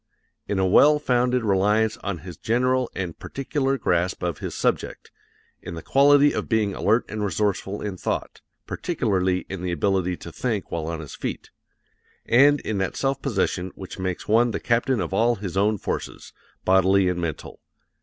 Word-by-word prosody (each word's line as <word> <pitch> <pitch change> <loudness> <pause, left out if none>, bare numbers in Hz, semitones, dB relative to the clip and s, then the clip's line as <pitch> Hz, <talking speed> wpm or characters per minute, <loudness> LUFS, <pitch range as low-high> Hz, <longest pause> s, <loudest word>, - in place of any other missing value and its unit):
In 100 - -1
a 95 - +2
well 145 +11 +6
founded 125 -3 +1
reliance 105 +2 +2
on 100 -3 -4
his 90 -3 -7
general 125 +4 +1
and 90 -4 -4
particular 135 0 -2
grasp 90 -4 0
of 85 -3 -2
his - - -5
subject; - - -2 0.5
in - - -7
the 80 - -8
quality 145 +1 +5
of - - -3
being 110 -4 +1
alert 110 +5 +1
and 110 0 -4
resourceful 100 +1 -1
in 100 -3 -4
thought - - -4 0.2
particularly 95 - -1
in 95 -2 -6
the 90 -1 -2
ability 90 0 0
to 85 - -10
think 110 0 -3
while 80 -2 -3
on 80 -1 -4
his 75 - -9
feet; - - -5 0.7
and 140 +4 +5
in 105 -2 -3
that 95 - -2
self 135 0 -1
possession 95 -7 -1
which 95 0 -9
makes 95 -1 -3
one 115 +3 +4
the - - -3
captain 120 +1 +1
of - - -3
all 120 +2 +3
his 95 -4 -6
own 105 +2 +2
forces, - - -5 0.3
bodily 95 0 +4
and 90 -1 -1
mental. 80 -4 -5
100 Hz, 175 wpm, -24 LUFS, 95-120 Hz, 0.7 s, well